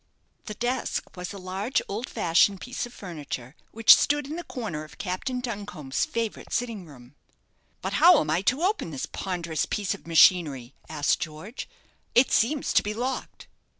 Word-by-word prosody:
The 215 - -6
desk 245 +3 -2
was 180 -1 -6
a 200 - -8
large 190 +6 -1
old 220 +5 -4
fashioned 195 -1 +3
piece 250 +4 -4
of - - -15
furniture, 150 - -7
which 225 0 +8
stood 295 0 +1
in 300 +3 -5
the 345 - -5
corner 210 - -5
of 155 - -14
Captain 205 +7 -3
Duncombe's 200 - -3
favourite 230 -2 -4
sitting 225 -7 -2
room. 125 -3 -15 0.7
"But - - -2
how 345 -2 +8
am - - -1
I 165 +3 +2
to 260 - +1
open 395 - 0
this 140 -4 -4
ponderous 170 -5 -3
piece 205 -2 -1
of 200 - -12
machinery?" 155 -7 +4 0.2
asked 150 -2 +1
George. 165 - -7 0.5
"It 245 +1 +5
seems 270 +6 +2
to - - +5
be 210 +1 -4
locked." 255 +3 -4
200 Hz, 170 wpm, -26 LUFS, 160-245 Hz, 0.7 s, which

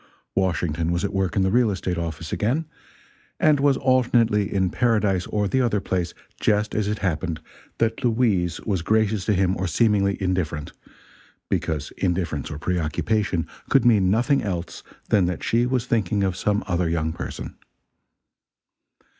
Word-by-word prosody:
Washington 85 -3 0
was 85 +2 -1
at 100 - -3
work 95 -3 0
in 95 - +3
the 95 - +1
real 120 0 +4
estate 90 -3 -2
office 80 -1 -5
again, 130 +10 0 0.7
and 150 -2 +4
was 140 -1 +3
alternately 120 -5 +2
in 95 -2 +1
paradise 105 -7 +1
or 105 -1 0
the 130 +6 +1
other 115 -4 +1
place 90 -3 -2 0.2
just 105 0 +1
as 105 -1 0
it 105 +1 -1
happened 85 -1 -1 0.4
that 115 +1 0
Louise 110 -8 +1
was 95 -6 -1
gracious 110 0 +1
to 105 - +2
him 95 0 +2
or 95 - -1
seemingly 100 +1 +2
indifferent 90 -6 -2 0.8
because 75 -3 -2
indifference 85 -7 -1
or 75 - -5
preoccupation 90 +3 -1 0.2
could 135 -4 +4
mean 105 -6 +4
nothing 120 +7 +2
else 90 -4 -4 0.3
than 100 -4 +4
that 90 -2 -3
she 120 +2 +2
was 125 -2 0
thinking 105 -4 0
of 95 -2 0
some 105 +3 0
other 90 -3 0
young 80 -1 -1
person. 85 - -6
100 Hz, 155 wpm, -23 LUFS, 85-110 Hz, 0.8 s, real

